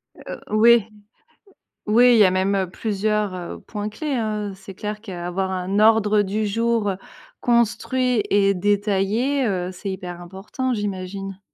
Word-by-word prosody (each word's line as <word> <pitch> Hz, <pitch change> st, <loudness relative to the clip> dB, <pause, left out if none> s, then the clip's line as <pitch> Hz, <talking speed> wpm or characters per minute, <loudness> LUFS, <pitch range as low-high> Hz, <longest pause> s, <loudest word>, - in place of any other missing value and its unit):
Heu, -, -, -9 dB, 0.2 s
oui. 225 Hz, 0 st, +5 dB, 1.0 s
Oui, 240 Hz, +4 st, +6 dB
il -, -, +5 dB
y -, -, +8 dB
a -, -, +5 dB
même, 190 Hz, +2 st, +1 dB
heu, 190 Hz, -2 st, -1 dB
plusieurs, 210 Hz, 0 st, -1 dB
heu, 180 Hz, -1 st, -6 dB
points 210 Hz, -1 st, -5 dB
clés, 290 Hz, +6 st, -4 dB
hein, 215 Hz, -3 st, -2 dB
heu, -, -, -9 dB
c'est 195 Hz, 0 st, -12 dB
clair 210 Hz, +2 st, -5 dB
qu'avoir 190 Hz, -2 st, -4 dB
un 190 Hz, +2 st, -1 dB
ordre 215 Hz, -1 st, +4 dB
du 210 Hz, +2 st, -1 dB
jour, 230 Hz, 0 st, 0 dB
heu, 190 Hz, -, -2 dB, 0.4 s
construit 240 Hz, +1 st, +1 dB
et 200 Hz, -1 st, +3 dB
détaillé, 205 Hz, +7 st, +1 dB
heu, 185 Hz, -3 st, -2 dB
c'est 185 Hz, +2 st, -6 dB
hyper 180 Hz, -2 st, -6 dB
important, 195 Hz, +9 st, -4 dB
j'imagine. 195 Hz, -1 st, -5 dB
205 Hz, 155 wpm, -22 LUFS, 190-225 Hz, 1.0 s, y